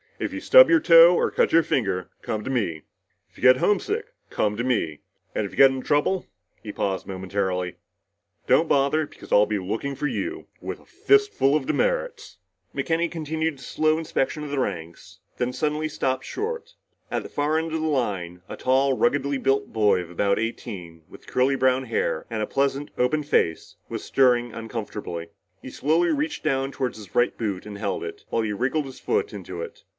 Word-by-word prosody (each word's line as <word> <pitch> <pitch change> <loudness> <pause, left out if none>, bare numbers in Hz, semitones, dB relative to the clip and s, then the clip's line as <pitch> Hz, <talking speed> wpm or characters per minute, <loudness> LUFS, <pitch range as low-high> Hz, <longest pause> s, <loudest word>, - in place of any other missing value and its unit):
If - - -3
you - - -4
stub - - +8
your 335 - +6
toe 170 - +8
or - - +2
cut - - +2
your 165 0 +5
finger, 95 -10 -1
come 110 -1 -3
to - - -5
me. 85 - -1 0.5
If - - -25
you - - -14
get 130 0 +7
homesick, 400 - 0 0.2
come 105 0 0
to 120 - -2
me. 95 - -1 0.3
And 105 - -1
if 100 - -6
you - - -13
get 135 -1 +8
into 130 -1 -5
trouble" 150 +6 +1 0.3
he 105 - -6
paused 95 -2 -2
momentarily 95 -1 -2 0.7
"don't - - +4
bother 145 +2 +2
because - - -15
I'll 105 0 +5
be 105 - -1
looking 110 +9 -3
for 150 - -4
you, 340 - -4
with - - -6
a - - -21
fist 415 0 +2
full 135 +2 +3
of 150 -3 0
demerits!" - - -1 0.4
McKenny 170 0 0
continued 160 -1 -2
his 135 - -12
slow 155 0 +1
inspection 150 -1 -2
of 145 - -6
the 140 - -1
ranks, 85 -9 -5 0.2
then 125 0 -1
suddenly 155 +2 -1
stopped 130 -3 -2
short. 470 +3 -4 0.4
At - - -1
the - - -9
far 150 +2 0
end 160 0 -2
of 160 - -1
the 160 - 0
line, 95 - -2
a - - -6
tall, 135 +1 +2
ruggedly 140 +1 +1
built 135 +1 0
boy 105 -4 +3
of 85 - -9
about 100 +3 +1
eighteen, 95 -7 -5
with - - -15
curly 130 +2 +2
brown 130 0 +2
hair 115 -8 -1
and 110 -2 -2
a - - -3
pleasant, 140 +1 -1
open 125 +5 +2
face, 80 - 0
was - - -5
stirring 120 -3 +3
uncomfortably. 105 -7 -6 0.3
He - - -8
slowly 165 +4 +2
reached 300 +1 -1
down 135 -2 0
toward 130 -4 -3
his 105 -4 -12
right 120 - +3
boot 100 -5 -3
and 100 -1 -8
held 100 -2 -2
it, - - -7
while 115 - 0
he 105 -1 -2
wriggled 135 +8 0
his 135 -1 -10
foot 435 -1 -1
into - - -7
it. 465 - -10
130 Hz, 200 wpm, -24 LUFS, 105-155 Hz, 0.7 s, stub